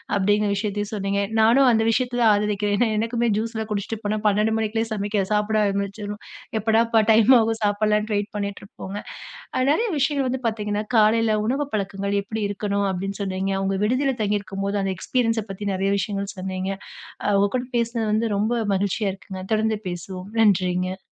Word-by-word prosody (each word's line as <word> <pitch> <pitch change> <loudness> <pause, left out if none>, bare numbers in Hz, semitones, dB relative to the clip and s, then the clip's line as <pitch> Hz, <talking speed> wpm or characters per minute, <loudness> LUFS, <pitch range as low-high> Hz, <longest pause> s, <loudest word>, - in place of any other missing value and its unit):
அப்படீங்கிற 205 +1 +2
விஷயத்தையும் 205 0 -2
சொன்னீங்க. 200 -1 -1 0.2
நானும் 240 +5 +5
அந்த 225 -1 +3
விஷயத்த 245 +1 0
தான் 225 -2 +6
ஆதரிக்கிறேன். 205 0 0
ஏன்னா 235 +1 +2
எனக்குமே 230 +2 0
ஜூஸ் 225 +2 -3
லாம் 220 0 -4
குடிச்சிட்டு 210 +2 -3
போனா 210 +1 0
12 210 +2 +2
மணிக்குள்ளயே 225 +1 -1
சமைக்க 205 -1 -1
சாப்பிட 210 +1 +1
ஆரம்பிச்சுருவோம். 200 +1 -3 0.4
எப்படாப்பா 225 +1 +3
டைம் 220 +2 +5
ஆகும்? 225 0 0
சாப்பிடலான்னு 210 +1 +1
வெயிட் 205 +1 -2
பண்ணிட்டு 200 -1 -3
இருப்போங்க. 195 0 -8 0.8
நிறைய 450 +10 +1
விஷயங்கள் 275 -1 +1
வந்து 260 0 -3
பார்த்தீங்கன்னா, 210 -2 -1
காலைல 220 +1 +4
உணவு 270 +5 0
பழக்கங்கள் 200 0 -2
எப்படி 220 +2 -5
இருக்கணும் 200 0 -1
அப்படீன்னு 195 +2 -4
சொன்னீங்க. 190 0 -2
அவுங்க 195 0 0
விடுதில 260 +4 +1
தங்கி 205 0 +1
இருக்கும்போது 195 0 -3
அந்த 195 0 -1
எக்ஸ்பீரியன்ஸ 230 +3 0
பத்தி 195 +1 -6
நெறைய 195 +1 0
விஷயங்கள் 200 0 -3
சொன்னீங்க. 185 0 -3 0.5
அ - - 0
உங்க 200 +1 +3
கூட 250 - -2
பேசினது 235 -1 0
வந்து 220 +2 +1
ரொம்ப 215 +4 +1 0.2
மகிழ்ச்சியா 200 +2 0
இருக்குங்க. 190 0 -9
தொடர்ந்து 220 0 +1
பேசுவோம். 185 +2 -6
நன்றிங்க. 185 -3 +2
210 Hz, 165 wpm, -23 LUFS, 200-225 Hz, 0.8 s, தான்